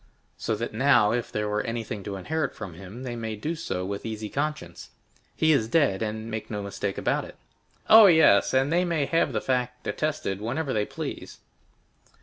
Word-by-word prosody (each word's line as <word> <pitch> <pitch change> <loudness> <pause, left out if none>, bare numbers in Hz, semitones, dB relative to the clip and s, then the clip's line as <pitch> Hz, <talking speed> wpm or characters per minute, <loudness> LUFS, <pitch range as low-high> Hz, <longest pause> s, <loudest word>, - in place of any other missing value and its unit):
"So 110 - -2
that 115 +2 -4
now, 110 -3 +4
if 120 0 -2
there 105 0 -2
were 105 0 0
anything 115 -3 -4
to 100 -2 -4
inherit 155 - -2
from 100 -5 -7
him, 100 +8 -10
they 120 -2 -4
may 110 -2 -4
do 150 +10 -3
so 95 - -4
with 100 +1 -4
easy 110 -1 -5
conscience. 150 +2 -4 0.5
He 160 - +3
is 120 -8 +2
dead, 125 -8 +2
and 110 +1 -4 0.2
no 105 -2 -4
mistake 100 0 -4
about - - 0
it." - - -11 0.5
"Oh, 220 -1 +9
yes; 160 - +5
and 135 +4 +2
they 175 +1 +3
may 165 -5 0
have 165 +4 +1
the - - -1
fact 125 -1 -2
attested 150 -11 -2
whenever 130 +6 -2
they 105 -1 +1
please." - - -6
115 Hz, 185 wpm, -26 LUFS, 105-150 Hz, 0.5 s, Oh